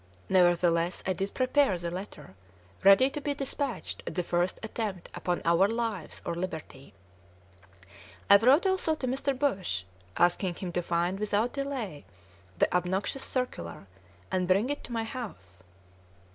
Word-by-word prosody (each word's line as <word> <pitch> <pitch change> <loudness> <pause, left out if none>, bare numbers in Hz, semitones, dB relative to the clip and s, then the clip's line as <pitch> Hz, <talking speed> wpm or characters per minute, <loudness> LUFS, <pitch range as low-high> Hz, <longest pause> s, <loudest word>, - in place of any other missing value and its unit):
Nevertheless, 175 -1 +3
I 185 - +1
did 195 +2 -3
prepare 255 -5 +3
the 170 0 -4
letter, 185 - -8 0.5
ready 200 +8 +7
to 295 - -5
be 285 0 -1
despatched 275 -1 -3
at - - -4
the 180 - 0
first 175 +1 0
attempt 215 -5 -4
upon 175 0 -2
our 170 +3 +5
lives 225 -6 -3
or - - -1
liberty. 160 - -6 1.3
I 200 - +9
wrote 260 - +5
also 375 -4 +2
to 280 - -4
Mr. 265 +1 -1
Bush, 195 - 0 0.3
asking 175 +1 +2
him 180 0 -5
to 175 - -1
find 175 +2 0
without 210 +3 0
delay 265 - -4 0.5
the - - +2
obnoxious 185 +9 0
circular, 100 - -4 0.5
and 185 -1 0
bring 200 +9 +3
it 290 - -4
to - - -11
my 230 -1 -1
house. 195 - -7
195 Hz, 145 wpm, -29 LUFS, 175-255 Hz, 1.3 s, I